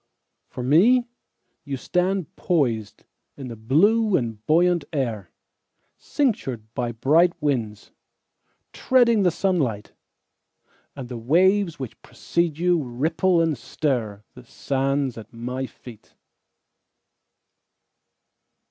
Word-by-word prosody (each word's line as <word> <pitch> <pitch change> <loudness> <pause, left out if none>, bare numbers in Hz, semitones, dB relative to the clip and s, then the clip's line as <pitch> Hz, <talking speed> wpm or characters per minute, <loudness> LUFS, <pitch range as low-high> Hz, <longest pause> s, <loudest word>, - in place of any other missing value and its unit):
For 125 - -7
me, 210 - +4 0.6
You 140 -2 -4
stand 180 +4 -1
poisedIn 120 - -1 0.4
the 115 - -7
blue 190 - +3
and 115 -3 -4
buoyant 175 +1 +3
air, 115 - -3 0.7
Cinctured 210 - -1
by 120 -2 -2
bright 165 +9 +2
winds, 120 -9 -2 0.8
Treading 235 -4 +3
the 185 - +4
sunlight. 155 - -1 1.0
And 135 -3 -7
the 120 -1 -7
waves 180 - +2
which 130 -5 -8
precede 170 -3 -2
youRipple 165 +2 +1
and 160 -2 0
stirThe 120 -3 -4
sands 135 -2 -2
at 110 0 -13
my 125 +3 -5
feet. 120 -4 -15
145 Hz, 95 wpm, -23 LUFS, 120-180 Hz, 1.0 s, me